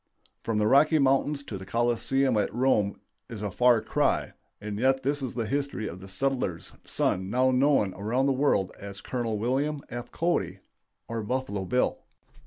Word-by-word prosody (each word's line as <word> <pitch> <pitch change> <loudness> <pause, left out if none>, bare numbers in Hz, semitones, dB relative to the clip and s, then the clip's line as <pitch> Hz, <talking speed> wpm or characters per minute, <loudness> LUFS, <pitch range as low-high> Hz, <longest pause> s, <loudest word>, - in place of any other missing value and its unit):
From 115 -2 -2
the 105 - +2
Rocky 145 +7 +5
Mountains 140 +1 +2
to 100 -8 -6
the 95 - -9
Colosseum 120 +4 +1
at 105 - +1
Rome 115 -5 +1 0.3
is 110 -3 -7
a 105 - -2
"far 120 +1 +4
cry," - - 0 0.3
and 105 0 -5
yet 135 +2 +2
that 145 +2 0
is 130 -3 -4
the 115 -2 -1
history 140 -3 -2
of 90 - -7
the 95 - -11
settler's 95 -4 -2
son 95 +1 -1
now 130 +4 +3
known 130 -6 +3
around 115 +7 0
the 140 - +3
world 130 -9 +1
as 100 0 -8
Col. 115 -3 -3
William 140 +6 -1
F. 120 +1 -7
Cody, 95 - -1 0.5
or 115 -1 -3
"Buffalo 105 -4 -2
Bill." 125 +6 +1
120 Hz, 175 wpm, -27 LUFS, 105-135 Hz, 0.5 s, Rocky